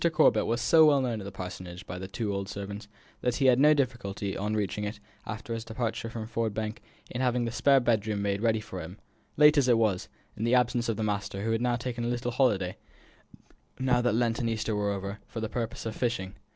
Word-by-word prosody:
Corbet 155 0 +4
was 120 +1 0
so 155 +7 +6
well 145 -2 +5
known 120 -5 -1
at - - -8
the 100 - -6
Parsonage 90 -1 -7
by 90 - -6
the 95 - -5
two 105 +1 -3
old 100 0 -3
servants, 100 +1 -6 0.3
that 125 -1 0
he 140 - +1
had 130 -1 +6
no 150 +2 +6
difficulty, 115 -8 -2
on 105 +2 -1
reaching 105 0 -1
it, 105 +1 -4 0.3
after 110 +3 -5
his 115 -1 -4
departure 115 0 -3
from 115 -1 -5
Ford 115 -2 -2
Bank, 110 0 -3 0.3
in 125 - -3
having 125 -1 +1
the 115 - -2
spare 140 +3 +4
bed 120 -4 +2
chamber 105 0 -2
made 100 0 0
ready 110 -1 +2
for 95 -4 -7
him, 90 +5 -9 0.4
late 150 0 +7
as 130 - +2
it 120 -2 +5
was, 105 -5 +1 0.3
and - - -8
in - - +1
the 120 +2 +4
absence 120 -1 +2
of 110 - -1
the 110 - -1
master, 100 -1 -2
who 115 - 0
had 120 +1 +1
taken 120 0 -3
a - - -1
little 120 0 -1
holiday, 105 -8 +1 1.0
now 125 -2 +2
that 120 -3 +2
Lent 115 -1 +1
and 115 - 0
Easter 110 -1 -1
were 105 0 0
over, 100 +1 -4
for 115 - -6
the 110 - -2
purpose 115 0 -4
of 110 -1 -3
fishing. 105 -6 -2
115 Hz, 240 wpm, -29 LUFS, 100-120 Hz, 1.0 s, late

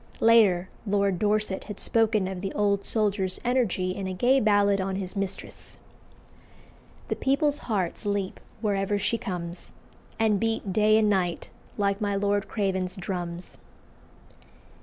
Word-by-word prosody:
Later 210 -6 +5 0.2
Lord 200 -2 +1
Dorset 210 -2 0
had 210 -1 -7
spoken 220 -4 +2
of 190 -1 -5
the 195 -1 -3
old 200 -1 +1
soldier's 205 -4 0
energy 230 -7 +1
in 190 0 -4
a 185 - -4
gay 255 +8 +3
ballad 205 -3 +3
on 190 0 -2
his 190 0 -4
mistress 195 -1 -6 1.3
"The - - 0
people's 285 +2 +1
hearts 190 -6 -1
leap 200 -2 -2 0.2
wherever 205 -1 0
she 230 +3 0
comes, 175 -4 -6 0.5
And 220 -3 +2
beat 225 -3 -1
day 215 +1 +4
and 220 -1 +3
night 185 -4 0 0.3
like 200 0 0
my 205 -1 0
Lord 200 0 0
Craven's 190 -3 -1
drums." 180 -2 -6
200 Hz, 140 wpm, -26 LUFS, 190-215 Hz, 1.3 s, Later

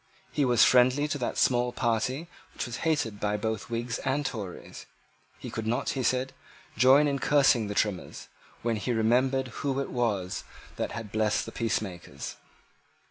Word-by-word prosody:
He 145 - +1
was 120 -3 +5
friendly 130 +3 +4
to 145 - -2
that 120 - -2
small 125 -1 +3
party 125 +6 -1 0.3
which - - -3
was 120 -2 -5
hated 150 -10 0
by 105 0 0
both 110 +1 -3
Whigs 115 0 -2
and 140 +2 -1
Tories. 105 -8 -6 0.5
He - - -8
could 110 -1 -4
not, 120 +2 0
he 135 - -1
said, 130 +1 0 0.4
join 130 +6 +6
in 140 -1 0
cursing 135 -7 +4
the 100 - -4
Trimmers, 100 -4 -2 0.4
when 115 -1 0
he 120 +4 -1
remembered 130 +4 +2
who 135 -1 -1
it 140 - -3
was 105 -7 -1 0.3
that - - -2
had 115 -3 -6
blessed 110 -1 +1
the - - -7
peacemakers. 95 - -4
120 Hz, 165 wpm, -28 LUFS, 110-130 Hz, 0.5 s, join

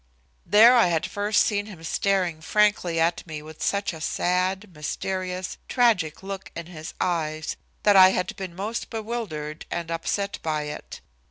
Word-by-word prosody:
There 225 +4 +8
I 235 -6 +6
had 165 -2 0
first 205 +1 +2
seen 205 -1 -1
him 180 -6 -11
staring 180 -1 0
frankly 180 -2 +2
at 165 +1 +1
me 155 -2 -6
with 155 0 -12
such 200 -2 0
a 160 - -9
sad, 185 +4 0
mysterious, 185 +4 -4
tragic 215 - +2
look 195 0 -6
in 170 - -5
his 160 -2 -9
eyes 160 -3 -1 0.3
that 205 -1 +5
I 185 -1 +9
had 180 -1 -1
been 185 -3 -6
most 210 +5 -4
bewildered 210 -10 -5
and 170 -1 -4
upset 200 +4 -2
by 155 -2 -1
it. 150 0 -7
180 Hz, 160 wpm, -25 LUFS, 160-205 Hz, 0.3 s, I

